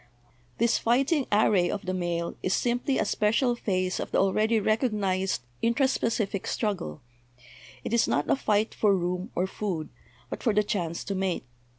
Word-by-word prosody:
This 235 0 +2
fighting 270 +5 +2
array 205 -4 +3
of 205 -1 -4
the 185 - -1
male 175 -2 -2
is 185 - +1
simply 245 +2 0
a - - +1
special 225 +5 +2
phase 185 -5 -1
of - - -4
the - - 0
already 215 +4 +2
recognised 200 - 0 0.2
intra 235 +4 +3
specific 220 -6 -1
struggle; 200 -8 -2 0.8
it - - -4
is 235 - +3
not 145 - 0
a - - +3
fight 215 -4 +1
for 205 -2 +3
room 180 +3 -2
or 180 - +1
food, 190 -5 -4 0.4
but - - -5
for 225 -5 +1
the 210 - +4
chance 175 -5 -2
to 200 - -3
mate. 190 -2 -1
205 Hz, 170 wpm, -27 LUFS, 185-230 Hz, 0.8 s, the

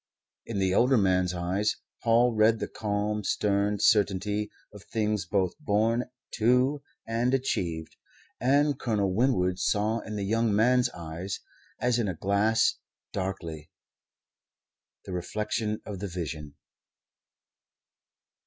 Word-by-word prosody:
In - - -3
the 95 -1 +1
older 125 +5 +4
man's 95 -3 +2
eyes 90 +4 0 0.3
Paul 120 +1 +4
read 110 +1 +4
the - - -3
calm, 105 0 -2
stern 100 +1 +1
certainty 105 0 +2 0.2
of 105 -2 -12
things 105 -5 -1
both 95 -2 +1
born 115 -1 +1 0.3
to 125 +5 +3 0.2
and 120 +3 +1
achieved; 85 -11 -2 0.4
and 140 +2 +2
Colonel 100 -6 0
Winwood 95 -6 +2
saw 105 +4 +1
in 110 - -7
the 100 -1 -2
young 115 0 +1
man's 125 +3 +4
eyes, 85 +3 -6 0.4
as 120 -1 +2
in 115 - 0
a 95 - -2
glass 100 +6 +2 0.3
darkly, 85 -5 -4 1.4
the 95 - -6
reflection 105 +4 -2
of 100 -3 -6
the 100 - -3
Vision. 80 -5 -6
105 Hz, 120 wpm, -28 LUFS, 95-115 Hz, 1.4 s, older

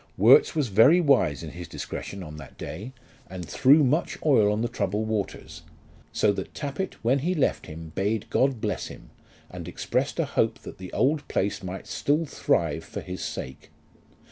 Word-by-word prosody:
Worts 445 - +6
was 145 -6 0
very 115 - +6
wise 135 - +3
in 80 - -6
his 90 -1 -8
discretion 100 -1 -6
on 75 -2 -9
that 70 -4 -12
day, 105 +11 -7 0.4
and 90 -3 -7
threw 140 - +5
much 145 +6 +1
oil 110 -9 +5
on 105 +2 0
the - - +1
troubled 105 -2 -2
waters; 100 -6 -4 0.5
so 105 - +3
that - - -6
Tappitt 150 +6 -4
when 130 +4 +3
he 175 +7 0
left 145 - 0
him 80 -1 -9
bade 100 +3 -1
God 135 -3 +2
bless 105 -2 -2
him, - - -12 0.4
and - - -8
expressed - - -2
a - - +2
hope - - 0
that - - -10
the 90 -1 -8
old 145 +2 +1
place 100 +1 -1
might 95 0 -6
still 150 +3 0
thrive - - 0
for - - -7
his 90 0 -6
sake. 65 - -6
110 Hz, 180 wpm, -26 LUFS, 90-140 Hz, 0.5 s, Worts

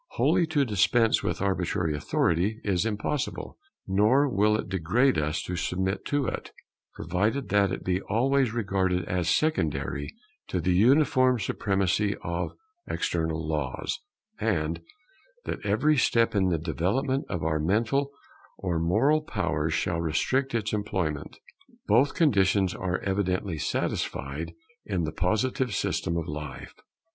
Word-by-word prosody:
Wholly 170 - +2
to 150 -3 +2
dispense 110 +1 +3
with - - -2
arbitrary 90 -4 0
authority 90 +8 0
is 100 +1 +1
impossible; 115 - -3 0.3
nor 110 +9 +4
will 105 -3 +2
it - - -4
degrade 95 - +2
us 75 +1 -1
to 90 - -4
submit 95 +3 -2
to 145 -2 0
it, - - -4 0.4
provided 105 - -1
that 100 -2 +3
it - - -4
be 95 +1 0
always 130 +4 +1
regarded 95 -5 0
as 90 -1 -1
secondary 75 - 0 0.4
to 90 - -2
the 90 +2 +1
uniform 130 - +4
supremacy 100 0 0
of 85 +1 -3 0.3
external 80 -1 -1
Laws, 75 -4 -2 0.4
and 85 -6 -1 0.6
that - - -4
every 150 0 +2
step 115 -3 +3
in 95 -3 +2
the 85 - +1
development 95 - -1
of 85 -4 -3
our 80 -1 0
mental 115 - +1 0.5
and 85 -3 0
moral 135 - +3
powers 80 - -1
shall 85 0 -1
restrict 130 - 0
its 105 -2 -1
employment. 95 -8 -2 0.5
Both 125 +7 +3
conditions 100 - +3
are 90 -1 -2
evidently 95 -3 -1
satisfied 75 +4 -3 0.3
in 95 -4 -2
the 80 - -2
Positive 110 - 0
system 85 -1 -1
of 85 - -3
life. 75 -3 -7
95 Hz, 135 wpm, -27 LUFS, 85-115 Hz, 0.6 s, nor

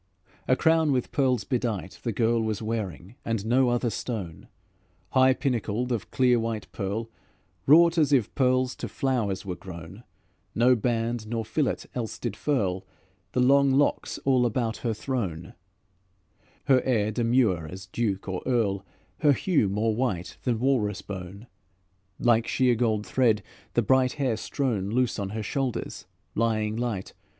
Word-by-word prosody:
A 130 - +4
crown 160 0 +3
with 125 -3 0
pearls 130 -6 +1
bedight, 110 - -3
the 120 - -2
girl 115 +1 +1
Was 110 -2 -1
wearing, 110 - -4
and 115 -3 -2
no 125 +2 +3
other 120 -1 0
stone; 100 -8 -5 0.6
High 130 0 +5
pinnacled 125 -2 -1
of 115 -5 -2
clear 125 -2 +3
white 115 -2 -3
pearl, 110 +4 -3 0.6
Wrought 165 +3 +6
as 150 -2 +3
if 125 -7 +2
pearls 130 -1 +2
to - - -4
flowers 110 -8 -1
were 90 -2 -3
grown. 90 +4 -10 0.5
No 125 +3 +5
band 115 -1 -1
nor 115 0 -2
fillet 140 +3 -1
else 115 -3 -4
did 115 -5 -4
furl 100 -11 -1 0.5
The 125 - +2
long 140 +1 +5
locks 145 +2 +1
all 130 -3 +4
about 115 -1 -1
her 115 -3 -2
thrown. 105 - -3 1.1
Her 130 -2 +4
air 110 -5 +1
demure 115 -8 +1
as 95 +3 -8
duke 100 -1 -2
or 95 -1 -3
earl, 105 -6 +1 0.4
Her 145 -3 +5
hue 145 - +1
more 110 +3 0
white 105 -8 -2
than 120 -3 0
walrus 115 -5 0
bone; 95 +2 -8 0.7
Like 115 -1 +3
sheer 125 -1 +3
gold 110 -3 0
thread 115 -6 +2 0.3
the - - +3
bright 130 -1 +3
hair 135 -6 0
strown 110 -3 -2
Loose 125 0 0
on 100 -1 -3
her 110 +2 -4
shoulders, 130 +2 -3 0.3
lying 110 -1 0
light. 115 -5 -3
115 Hz, 150 wpm, -26 LUFS, 105-130 Hz, 1.1 s, Wrought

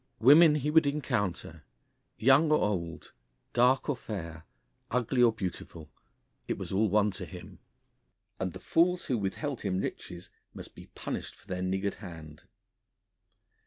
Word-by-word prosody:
Women 150 +6 +7
he 150 0 -1
would 160 -2 +5
encounter 120 - -2 0.5
young 135 +6 +4
or 150 - +5
old, 85 -6 -3 0.4
dark 125 +2 +3
or 145 - 0
fair, 85 -8 -7 0.4
ugly 125 +1 0
or 120 -1 +6
beautiful, 90 -6 -7 0.6
it - - -2
was - - -6
all 105 +3 +2
one 105 +1 +2
to 95 - -6
him - - -11 0.8
and 95 -2 -2
the - - -8
fools 175 +2 +1
who 125 - 0
withheld 120 +8 -3
him 95 -2 -1
riches 90 -1 -6 0.2
must - - -10
be - - -13
punished - - -5
for - - -22
their 95 -2 -4
niggard 95 +2 -1
hand. 80 -6 -11
105 Hz, 145 wpm, -29 LUFS, 90-140 Hz, 0.8 s, Women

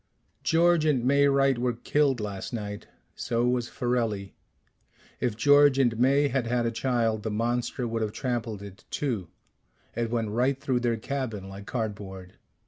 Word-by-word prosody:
"George 170 0 +3
and 140 -6 +2
May 140 +2 +4
Wright 135 -2 +3
were 125 0 +1
killed 135 +2 +1
last 100 +1 -5
night. 105 -2 -5 0.3
So 120 0 -1
was 125 -1 0
Farelli. 115 -5 -1 0.9
If 120 -4 -1
George 145 +2 +6
and 120 -4 +2
May 140 +3 +4
had 130 -3 -1
had 120 0 +1
a 115 - 0
child, 115 -2 0
the 110 - -3
monster 120 +3 -1
would 115 0 -2
have 110 -1 -1
trampled 115 -5 -3
it 100 -1 -11
too 115 -11 -2 0.7
it 115 0 -1
went 115 -2 -1
right 130 +4 +1
through 130 -3 0
their 120 -2 0
cabin 115 -5 -4
like 100 +1 -10
cardboard. 100 -5 -5
120 Hz, 160 wpm, -27 LUFS, 110-130 Hz, 0.9 s, George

